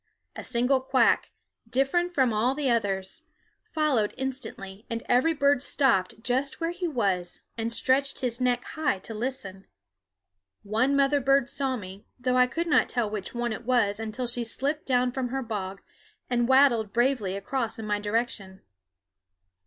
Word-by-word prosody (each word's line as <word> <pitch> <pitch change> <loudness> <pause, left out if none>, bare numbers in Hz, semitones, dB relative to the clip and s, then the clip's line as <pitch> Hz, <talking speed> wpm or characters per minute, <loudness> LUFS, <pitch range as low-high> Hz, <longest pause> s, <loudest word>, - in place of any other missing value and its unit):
A - - -6
single 255 +2 +1
quack, 260 -2 +3 0.4
different 345 +8 +1
from 260 -4 +3
all 245 +7 +1
others, 220 -2 0 0.5
followed 285 -10 +1
instantly, 220 -7 -5
and 230 0 -3
every 260 +7 +3
bird 280 -2 +3
stopped 225 -8 +1
just 260 +3 -1
where 330 0 -1
he 355 0 -3
was 195 - -1
and 230 0 -2
stretched 270 +3 +2
his 245 -1 -2
neck 245 -1 +1
high 310 -10 -1
to 195 +4 -9
listen. 210 -5 -5 1.0
One 225 +7 +1
mother 280 +1 +3
bird 275 0 +3
saw 265 -2 -1
me, 190 -1 -10
though 250 0 0
I 250 0 +5
could 330 +6 -2
not 295 -6 +3
tell 235 -4 -1
which 210 +1 -5
one 240 -1 -1
it 230 - -7
was 230 -4 +1
until 225 +3 -4
she 240 0 -1
slipped 280 +6 -3
down 250 -1 +2
from 255 0 -2
her 265 +2 -3
bog 195 -4 -5 0.5
and 240 -1 +2
waddled 255 -6 +4
bravely 240 -6 +1
across 225 +2 -3
in 220 - -6
my 210 -1 0
direction. 205 -3 -3
245 Hz, 160 wpm, -27 LUFS, 215-270 Hz, 1.0 s, I